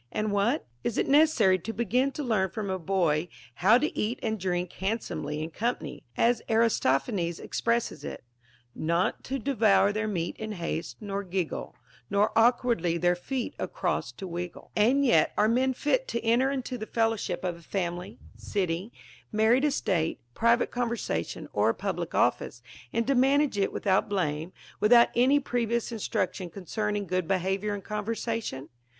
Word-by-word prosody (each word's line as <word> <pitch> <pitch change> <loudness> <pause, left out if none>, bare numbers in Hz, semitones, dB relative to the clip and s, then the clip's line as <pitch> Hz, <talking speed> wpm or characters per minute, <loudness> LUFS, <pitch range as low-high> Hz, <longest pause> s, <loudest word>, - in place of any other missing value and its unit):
And 215 0 -1
what 205 +8 +2
I - - -31 0.2
is 235 - -2
it - - +2
neces 300 +3 +6
sary 190 -10 +3
to 225 - -5
begin 245 +5 +1
to 300 - -4
learn 210 -7 +1
from 205 0 -4
a 190 - -2
boy 170 -3 +1 0.3
how 210 +6 +7
to 300 +4 -1
eat 220 +4 -1
and 220 -1 -1
drink 180 -1 -2
hand 210 +5 -1
somely 150 +1 -4
in 160 - -6
company, 235 +9 -3 0.2
as 235 0 +3
Aristophanes 195 - +1
expresses 235 0 -1
it, - - -7 0.3
— 120 +1 -38
Not 170 +3 0
to 270 - -2
devour 220 -6 +3
their 215 +1 -1
meat 175 -5 -2
in 220 0 -5
haste, 170 -3 -4
nor 200 -1 -3
giggle, 185 -3 -3 0.3
Nor 205 +2 +2
awliwardly 230 -7 +3
their 175 0 +3
ieot 245 +8 -4
across - - -2
to 190 - -7
\vriggle,t 175 0 -6
and 255 +7 +4
yet 240 - +4
are 210 - +4
men 255 +4 +2
fit 295 - 0
to 235 - -2
enter 240 +4 +3
into 260 -2 -3
tlie 220 - -6
fellowship 225 -6 0
of 175 -2 -2
a - - -16
fiimily, 175 0 -4 0.2
city, 185 +2 -2 0.4
married 225 +6 +3
estate, 185 - 0
private 235 - +2
conversation, 235 - -2
or 105 +2 +3
public - - -3
ofRce, 120 0 0 0.3
and 230 - 0
to 275 - +2
manage 270 -2 +3
it 195 - +1
without 190 +1 +1
blame, 165 -4 -1 0.3
without 235 +3 +6
any 260 +4 +5
previous 235 -3 -1
in 225 - -5
struction 185 -2 -2
concerning 205 +3 -3
good 185 -1 -1
behavior 195 +2 0
in 200 - -8
conversation 210 - -3
210 Hz, 170 wpm, -28 LUFS, 180-235 Hz, 0.4 s, how